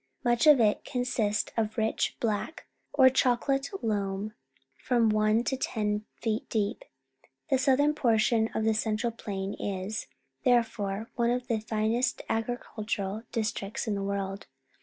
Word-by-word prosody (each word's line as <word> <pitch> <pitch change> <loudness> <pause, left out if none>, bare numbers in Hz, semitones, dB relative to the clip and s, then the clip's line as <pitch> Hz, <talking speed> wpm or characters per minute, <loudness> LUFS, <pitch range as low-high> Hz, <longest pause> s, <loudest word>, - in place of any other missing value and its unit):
Much 240 +3 +3
of 295 -4 +8
it 215 -2 +3
consists 240 -4 -1
of 220 -1 -1
rich 220 0 0
black 225 +7 -2 0.3
or 270 -2 +6
chocolate 265 +2 +2
loam 205 -1 -1 0.4
from 235 - +2
one 215 +2 +3
to 265 - 0
ten 210 -4 -1
feet 220 -1 -2
deep. 210 -2 -1 0.7
The 265 - +4
southern 280 +2 +3
portion 225 -4 +2
of 220 - 0
the 220 0 +3
central 220 +2 0
plain 200 -3 -4
is, 200 +2 -4 0.4
there 245 -3 +5
fore, 220 -1 -5
one 235 -1 +2
of 245 +1 0
the 230 -2 +1
finest 220 +3 0
agricultural 220 -3 -2
districts 215 -2 -2
in 220 - -1
the 200 - -2
world. 195 0 -3
220 Hz, 140 wpm, -29 LUFS, 210-245 Hz, 0.7 s, of